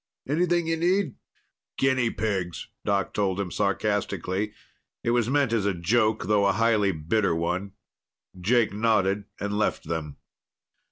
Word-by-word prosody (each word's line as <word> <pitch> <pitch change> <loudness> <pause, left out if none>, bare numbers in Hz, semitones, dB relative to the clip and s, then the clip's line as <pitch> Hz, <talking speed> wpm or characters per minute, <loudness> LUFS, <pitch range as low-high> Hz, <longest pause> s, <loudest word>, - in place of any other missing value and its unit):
Anything 170 +3 +1
you 165 0 0
need?" 175 -3 +1 0.6
"Guinea 130 -3 +2
pigs," 95 -7 -3
Doc 100 -2 0
told 100 -2 0
him 95 -3 -2
sarcastically. 100 +4 -1 0.5
It 115 - +1
was 120 -1 +2
meant 140 -4 +2
as 105 -3 +1
a 100 - 0
joke, 110 +4 +1
though 100 0 +3
a 100 - +3
highly 110 -2 +3
bitter 85 +3 0
one. 90 +4 -2 0.7
Jake 110 +3 +2
nodded 105 -2 +1
and 100 +1 -2
left 110 - 0
them. 80 -3 -4
105 Hz, 135 wpm, -26 LUFS, 95-120 Hz, 0.7 s, though